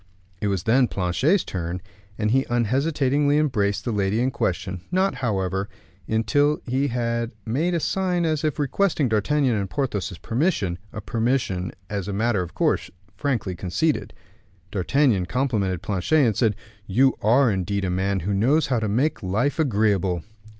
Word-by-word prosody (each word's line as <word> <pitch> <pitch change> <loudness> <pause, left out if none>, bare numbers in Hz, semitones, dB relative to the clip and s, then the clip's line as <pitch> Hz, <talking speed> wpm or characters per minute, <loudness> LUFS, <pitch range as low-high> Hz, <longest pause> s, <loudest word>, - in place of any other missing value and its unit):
It 105 - 0
was 95 -4 -1
then 125 +3 +4
Planchet's 115 - +1
turn, 90 0 -4 0.4
and 105 -1 0
he 135 +2 +2
unhesitatingly 140 +4 +2
embraced 105 -9 0
the 120 - 0
lady 100 0 0
in 130 +2 +1
question, 95 -6 -2
not, 190 +2 +2
however, 95 -4 -1 0.4
until 145 +7 +2
he 135 +3 0
had 115 -2 -2
made 155 +10 0
a - - +1
sign 180 0 0
as 155 -2 0
if 155 -3 0
requesting 150 -1 +1
D'Artagnan's 120 +2 +2
and 100 -1 -3
Porthos's 105 -9 -2
permission, 115 - -1
a 110 - -6
permission 110 -6 -1 0.2
as 100 -2 -4
a 100 - -3
matter 110 -1 +1
of 90 -1 -7
course - - +1 0.3
frankly 115 -10 -1
conceded. 95 - -1 0.6
D'Artagnan 105 -2 +2
complimented 105 - -1
Planchet, 105 - +2
and 110 -4 +1
said, 110 -2 +2 0.3
"You 130 +7 +4
are 120 +3 +4
indeed 100 +1 -1
a 90 - -1
man 95 +1 0
who 100 +5 -1
knows 130 +11 +3
how 130 -4 0
to 110 - -1
make 130 +10 0
life 110 - 0
agreeable." 100 - +1
115 Hz, 155 wpm, -24 LUFS, 100-140 Hz, 0.6 s, then